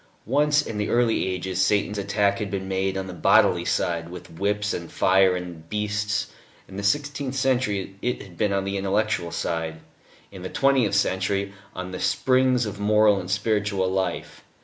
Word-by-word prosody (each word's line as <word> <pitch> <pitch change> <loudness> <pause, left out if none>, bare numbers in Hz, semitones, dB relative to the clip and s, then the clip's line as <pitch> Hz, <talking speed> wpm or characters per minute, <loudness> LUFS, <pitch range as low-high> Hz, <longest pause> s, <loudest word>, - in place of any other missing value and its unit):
Once, 150 +4 +3
in 110 -6 -5
the 105 - -1
early 120 -5 +2
ages, 95 0 -2
Satan's 105 0 +1
attack 100 +1 +1
had 105 -2 -3
been 95 -1 -4
made 95 0 -1
on 95 - -3
the 95 - -7
bodily 90 - +4
side, 85 -1 -1
with 90 -1 -10
whips 105 +1 0
and 85 -1 -6
fire 95 0 +4
and 85 -3 -7
beasts; 105 0 -1 0.4
in 95 - -12
the 100 - -4
sixteenth 140 +4 -1
century 120 -8 0
it 125 0 -1
had 95 -4 -14
been 105 +4 0
on 100 0 0
the 100 0 -2
intellectual 100 -2 0
side; 80 -1 -3 0.5
in 95 - -10
the 95 - -5
twentieth 135 -8 +2
century 100 0 0 0.2
on 90 0 -5
the 90 - -5
springs 130 -1 +2
of 105 -1 -6
moral 105 0 +4
and 90 -1 -7
spiritual 105 -2 0
life. 95 0 -3
100 Hz, 175 wpm, -24 LUFS, 95-110 Hz, 0.5 s, bodily